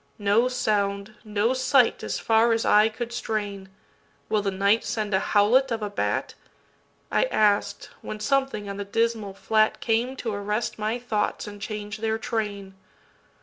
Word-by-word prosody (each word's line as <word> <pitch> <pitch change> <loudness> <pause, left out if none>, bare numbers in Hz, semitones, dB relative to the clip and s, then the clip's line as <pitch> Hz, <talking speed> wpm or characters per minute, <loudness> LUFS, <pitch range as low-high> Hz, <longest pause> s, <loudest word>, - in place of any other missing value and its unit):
No 210 +4 +3
sound, 205 -4 -1
no 215 +2 0
sight 260 -1 +3
as - - -2
far 225 +1 +3
as 225 - 0
eye 210 +1 +5
could 235 +1 -6
strain. 205 -4 -4 0.6
Will 215 -1 +2
the 200 - -1
night 200 +3 +2
send 215 -2 -3
a 190 - +4
howlet 240 +8 +3
of 225 -2 -2
a 205 - -3
bat?I 205 - -4
asked: 205 - +1
when 215 - -6
something 265 -2 0
on 200 0 -5
the 200 - -3
dismal 220 -1 -1
flatCame 225 +4 +1
to 225 -4 -3
arrest 210 +3 -2
my 215 +3 -1
thoughts 230 -4 -2
and 205 -1 -9
change 210 0 -5
their 220 0 0
train. 205 -4 -4
215 Hz, 150 wpm, -25 LUFS, 205-230 Hz, 0.6 s, eye